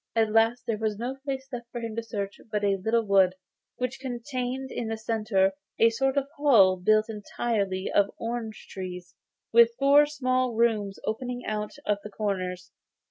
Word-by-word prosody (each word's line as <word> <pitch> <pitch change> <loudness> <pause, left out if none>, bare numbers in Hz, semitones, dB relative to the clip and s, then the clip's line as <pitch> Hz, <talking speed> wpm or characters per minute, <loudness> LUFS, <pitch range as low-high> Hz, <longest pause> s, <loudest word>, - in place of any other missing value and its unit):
At 220 -1 +2
last 225 +2 +3
there 225 -3 -2
was 215 -2 -1
no 250 +4 -4
place 270 -1 -4
left 240 -1 -5
for 240 - -4
him 230 -2 -5
to 230 - -1
search 205 -3 -5
but 210 -1 -1
a 200 -1 +3
little 230 +1 +2
wood, 190 -2 +4 0.4
which 250 +1 -3
contained 255 0 -4
in 235 - -3
the 225 0 -3
centre 215 -3 +1 0.3
a 230 0 +5
sort 270 +4 0
of 275 -1 +1
hall 225 -11 +6
built 215 +4 +3
entirely 205 -3 -2
of 200 0 +3
orange 230 -1 -5
trees, 180 -1 -7 0.4
with 235 0 +6
four 285 +2 +6
small 255 -4 0
rooms 215 -4 +1
opening 245 +3 -3
out 210 0 -3
of 205 -1 +1
the 210 - -7
corners. 185 -3 -3
225 Hz, 175 wpm, -27 LUFS, 205-245 Hz, 0.4 s, hall